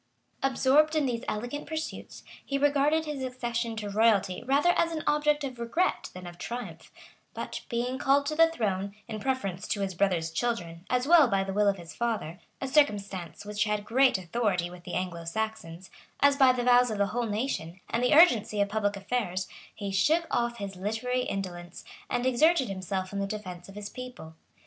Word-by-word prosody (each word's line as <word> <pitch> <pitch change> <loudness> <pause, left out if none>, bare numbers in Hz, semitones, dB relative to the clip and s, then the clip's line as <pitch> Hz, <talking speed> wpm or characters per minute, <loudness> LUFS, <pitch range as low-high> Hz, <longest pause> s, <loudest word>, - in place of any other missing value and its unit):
Absorbed 275 +4 +3
in 305 -2 +2
these 240 -2 -2
elegant 245 +7 -4
pursuits, 315 +1 -6 0.2
he 275 - -2
regarded 290 +3 +2
his 295 -3 -4
accession 240 -2 -3
to 215 -2 -4
royalty 205 -4 +2
rather 280 +7 +3
as 335 -1 +1
an 315 -2 -3
object 295 0 +2
of 255 -3 -5
regret 235 +11 0
than 185 0 -8
of 175 0 -10
triumph;[] 185 -8 -7 0.4
but - - -5
being 245 +2 -2
called 280 +1 +3
to 305 - -1
the 330 +1 +6
throne, 200 -9 -2
in 220 -2 -5
preference 200 -8 -2
to 205 - -1
his 195 -1 -2
brother's 170 -3 0
children, 170 -4 -3
as 250 0 +1
well 325 -4 +7
by 195 -3 +1
the 195 0 -4
will 205 +1 +3
of 200 -1 +2
his 170 -2 -10
father, 215 -8 -2 0.2
a 270 - -3
circumstance 200 - 0
which 210 +1 -1
had 210 -1 -1
great 255 0 +4
authority 185 -2 -1
with 180 -1 -13
the 175 - -5
Anglo 175 -2 -3
Saxons[] 185 -2 -4 0.3
as 285 0 +5
by 265 -2 +6
the 250 -1 -1
vows 245 0 +5
of 215 - -3
the 200 - +3
whole 240 0 0
nation, 205 -6 -3
and 235 +2 -1
the 250 +4 +4
urgency 235 - +5
of 200 0 +2
public 205 -1 0
affairs, 195 -3 -2 0.3
he 200 -2 -4
shook 310 - +2
off 235 0 0
his 200 -3 -6
literary 225 +6 -2
indolence, 175 -3 -5 0.2
and 245 - -1
exerted 265 +2 +3
himself 190 0 -4
in 200 - -2
the 195 - -1
defence 190 -4 -7
of 195 - -12
his 205 -1 -6
people. 245 -9 -9
225 Hz, 190 wpm, -28 LUFS, 195-260 Hz, 0.4 s, well